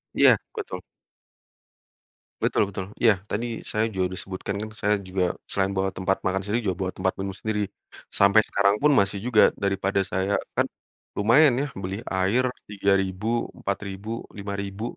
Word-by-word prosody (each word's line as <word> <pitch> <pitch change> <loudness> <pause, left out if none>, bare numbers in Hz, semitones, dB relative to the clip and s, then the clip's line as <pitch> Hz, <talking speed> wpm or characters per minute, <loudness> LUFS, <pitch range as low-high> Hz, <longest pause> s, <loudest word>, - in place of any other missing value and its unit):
Iya, - - +7 0.2
betul. - - -5 1.6
Betul 100 - +2
betul, 95 -1 -5 0.2
iya 115 -2 +7 0.2
tadi 115 +4 -1 0.3
saya 110 +1 +1
juga 95 -3 0
disebutkan 95 +1 -5
kan, 110 - -5
saya 105 0 +3
juga 95 0 -1 0.3
selain 95 0 0
bawa 95 0 +1
tempat 95 +1 0
makan 95 +1 0
sendiri 110 +4 0
juga 90 - -2
bawa 90 - -2
tempat 95 - +1
minum 95 0 -3
sendiri. 105 +1 -2 0.5
Sampai 100 +2 +5
sekarang 100 +1 +2
pun 150 +5 +4
masih 100 -4 +3
juga 120 -4 +6
daripada 100 0 0
saya 95 +2 0 0.2
kan - - +2 0.5
lumayan 120 +5 +5
ya - - 0 0.2
beli 95 +1 -3
air 95 +7 +1 0.3
Rp.3000 100 +3 0
Rp.4000 100 +1 -4 0.3
Rp.5000. 100 +1 -5
100 Hz, 150 wpm, -25 LUFS, 95-105 Hz, 1.6 s, Iya